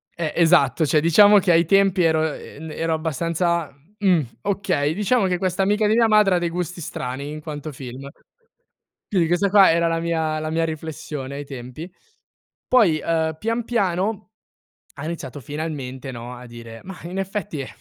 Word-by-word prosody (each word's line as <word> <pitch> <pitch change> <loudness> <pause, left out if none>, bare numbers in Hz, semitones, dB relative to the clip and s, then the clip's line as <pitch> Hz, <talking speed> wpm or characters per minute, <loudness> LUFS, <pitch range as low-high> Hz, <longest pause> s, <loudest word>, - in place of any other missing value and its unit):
Eh, 165 -3 -3
esatto, 165 -3 +4
cioè, 155 +1 +3
diciamo 205 +6 +6
che, 185 -1 +2
ai 170 0 +4
tempi, 195 +1 +3
ero 160 -1 +2
e - - -11 0.2
ero 165 0 -1
abbastanza: 165 0 -1 0.2
"Mhmm, 180 -7 +3 0.2
okay, 190 -7 0
diciamo 210 +3 +1
che 180 -1 0
questa 185 +1 -1
amica 210 +2 +2
di 215 - +3
mia 230 -1 +4
madre 210 -3 +4
ha - - +3
dei 175 -1 -1
gusti 175 0 -4
strani 135 0 -5
in 155 - -7
quanto 150 0 -6
film." 130 0 -9 1.0
Quindi 180 -5 +2
questa 175 +4 +2
qua 195 -2 +7
era 170 0 +2
la 165 0 0
mia 160 -2 -1
la 155 0 -3
mia 165 0 +1
riflessione 150 -3 -6
ai 145 0 -6
tempi. 135 +6 -8 0.8
Poi, 195 -11 +4
ehm, 160 -1 0
pian 230 +4 -1
piano 210 0 -1 0.7
ha 140 - -7
iniziato, 155 -4 -6
finalmente, 140 -2 -5
no, 120 0 -8
a 125 0 -11
dire: 115 -1 -10
"Mah, 185 -2 -10
in 175 +3 -6
effetti, 195 -6 -4
ehm, 130 - -6
165 Hz, 175 wpm, -22 LUFS, 150-190 Hz, 1.0 s, qua